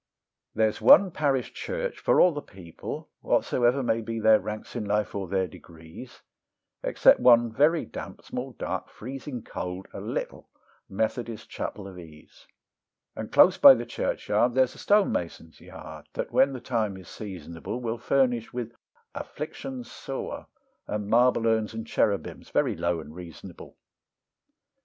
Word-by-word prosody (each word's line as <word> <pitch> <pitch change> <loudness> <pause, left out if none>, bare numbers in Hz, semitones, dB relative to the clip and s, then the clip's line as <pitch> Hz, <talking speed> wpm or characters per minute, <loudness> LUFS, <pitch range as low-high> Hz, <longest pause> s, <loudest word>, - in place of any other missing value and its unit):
There's 110 0 +1
one 180 - +7
parish 140 -5 0
church - - -4
for - - +3
all 180 - +7
the 150 -2 -5
people, 90 - -9
whatsoever 125 +2 +1
may 115 -1 +1
be 115 0 -4
their 110 0 +6
ranks 105 +3 -7
in 120 - -2
life 105 0 -1
or 100 -2 -3
their 95 +1 0
degrees, 80 +6 -13 0.6
Except - - +4
one 120 -2 +5
very 155 +7 +3
damp, - - -9
small, - - -6
dark, - - -4
freezing 130 +1 -7
cold, 90 +1 -6
a - - -6
little - - -5 0.4
Methodist 110 +2 -3
Chapel 100 -2 -5
of 95 -2 -10
Ease; 80 -3 -15 0.7
And - - -6
close - - +6
by 135 - +10
the 120 0 -4
churchyard, 120 +1 0
there's 130 -1 +3
a - - -14
stone 205 -1 +3
mason's 85 -1 -5
yard, - - -11
that - - -4
when 135 0 +4
the 130 - -6
time 110 -6 -1
is 95 -3 -13
seasonable 90 +1 -7
Will 115 -1 -3
furnish 125 -2 +1
with 120 -2 -5 0.4
afflictions 260 -2 -7
sore 135 - -6 0.4
and 105 -1 -3
marble 120 0 +4
urns 110 -1 +1
and 115 0 -5
cherubims, 100 -3 -1
very - - +1
low 85 -1 -1
and 75 0 -12
reasonable. 85 -2 -11
115 Hz, 150 wpm, -27 LUFS, 95-125 Hz, 0.7 s, by